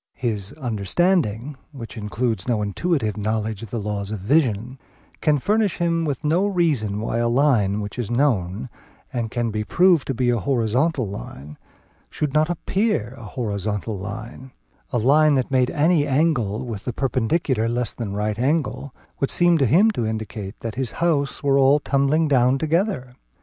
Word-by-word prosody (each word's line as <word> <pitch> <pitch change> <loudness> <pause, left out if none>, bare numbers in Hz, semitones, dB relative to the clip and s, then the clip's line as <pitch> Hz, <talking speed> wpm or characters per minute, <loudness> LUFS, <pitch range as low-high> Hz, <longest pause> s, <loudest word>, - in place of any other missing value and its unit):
His 105 -6 -2
understanding, 125 - 0 0.2
which 120 -5 -8
includes 110 -1 -2
no 115 -4 +1
intuitive 110 - -1
knowledge 110 0 -2
of 115 - -8
the 115 - -3
laws 105 -2 -3
of 110 - -3
vision, 125 - +1 0.4
can 150 -2 +3
furnish 210 +6 +1
him 170 -1 0
with 145 -1 -3
no 170 +7 +2
reason 145 - 0
why 115 +1 -2
a 120 0 +1
line 115 -6 +2
which 105 +4 -6
is 120 - -3
known 120 -4 0 0.5
and 120 -3 -2
can 120 0 -2
be 105 0 -2
proved 175 - +3
to 135 - -2
be 125 0 +2
a 120 - +1
horizontal 130 +2 +1
line, 75 -3 -8 0.5
should 150 -3 -3
not 155 +1 +3
appear 175 - -1
a 120 - -12
horizontal 105 -2 -3
line; 110 +6 -7 0.4
a 125 - -1
line 145 +5 +4
that 130 0 -1
made 130 -2 +3
any 155 -1 +2
angle 130 -6 +1
with 110 -4 -6
the 125 - -2
perpendicular 130 -1 0
less 120 -1 -1
than 110 -5 -5
a - - -4
right 105 +1 -1
angle, 140 -1 -1 0.2
would 140 - 0
seem 175 -1 +3
to 135 - +3
him 195 - +5
to 160 - -2
indicate 110 -2 -5
that 115 -1 -4
his 130 -2 -3
houses 150 -4 0
were 140 -1 +3
all 135 +2 +5
tumbling 145 +3 +1
down 130 -2 +3
together. 160 - -1
125 Hz, 170 wpm, -22 LUFS, 110-150 Hz, 0.5 s, him